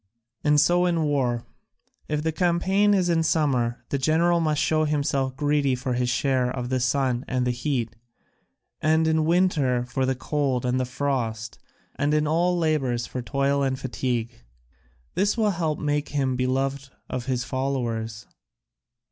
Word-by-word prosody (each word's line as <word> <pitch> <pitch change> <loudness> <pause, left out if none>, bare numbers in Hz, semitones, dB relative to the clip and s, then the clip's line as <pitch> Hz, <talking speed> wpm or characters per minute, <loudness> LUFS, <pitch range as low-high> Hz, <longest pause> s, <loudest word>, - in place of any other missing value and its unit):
And 150 0 +4
so 175 +4 +3
in 170 -2 +1
war; 130 -5 0 0.6
if 150 -1 -2
the 160 - 0
campaign 190 +4 +2
is 185 -2 +2
in 170 -2 +2
summer 135 -7 0
the 140 - -1
general 165 +5 +3
must 155 -3 +1
show 155 0 +2
himself 140 -3 -1
greedy 145 -2 +1
for 125 0 -3
his 125 0 0
share 125 0 +1
of 125 -1 -4
the 130 0 0
sun 130 -1 0
and 125 -1 0
the 125 - +1
heat, 120 -3 -2 0.9
and 160 +1 +3
in 160 -1 +2
winter 155 -8 +2
for 130 +2 -1
the 130 - +1
cold 135 -2 -1
and 125 +1 +1
the 130 - 0
frost, 120 -4 -3 0.4
and 145 +2 +1
in 150 0 +2
all 175 +4 +1
labours 135 -8 0
for 125 - -5
toil 140 +2 0
and 135 -1 0
fatigue. 120 - -3 0.7
This 200 +4 +1
will 215 -2 +2
help 165 -4 -1
to - - -6
make 145 0 0
him 135 -3 0
beloved 135 +2 -1 0.2
of 125 0 -5
his 125 -2 0
followers." 120 -5 -3
140 Hz, 165 wpm, -25 LUFS, 125-155 Hz, 0.9 s, And